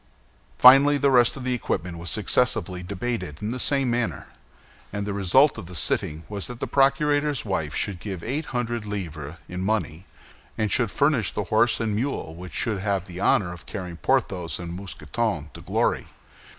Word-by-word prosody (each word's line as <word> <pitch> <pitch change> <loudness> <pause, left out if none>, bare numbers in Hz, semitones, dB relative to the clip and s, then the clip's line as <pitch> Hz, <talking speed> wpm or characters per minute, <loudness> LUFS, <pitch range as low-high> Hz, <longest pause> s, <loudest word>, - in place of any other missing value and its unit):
Finally, 135 +3 +8
the 140 0 +2
rest 125 0 +4
of 135 - -7
the 130 0 0
equipment 90 -7 -3
was 85 0 -5
successively 90 +4 +1
debated 95 -4 -4
in 105 +2 -3
the 125 - -4
same 135 0 +2
manner; 120 -1 -2 0.6
and 100 0 -3
the 100 - -3
result 105 +8 +4
of 95 - -9
the 90 - -9
sitting 75 +2 0
was 100 -2 -4
that 120 -1 -8
the - - -2
procurator's 145 0 +2
wife 80 -7 -2
should 95 -4 -2
give 95 -3 -6
eight 145 +7 -2
hundred 120 -2 -2
livres 85 -7 -5
in 90 0 -5
money, 95 -4 -2 0.5
and 110 -3 0
should 115 +1 +3
furnish 140 -3 +2
the 105 - -2
horse 120 +2 +4
and 115 -2 -1
the - - -1
mule 120 - -3
which 90 +2 -9
should 110 -5 -1
have 100 -2 -1
the 90 -1 -8
honor 95 -2 +2
of 85 - -13
carrying 90 -3 -6
Porthos 95 -9 0
and 85 -1 -6
Mousqueton 90 -2 -3
to - - -10
glory. - - 0
105 Hz, 185 wpm, -25 LUFS, 90-125 Hz, 0.6 s, Finally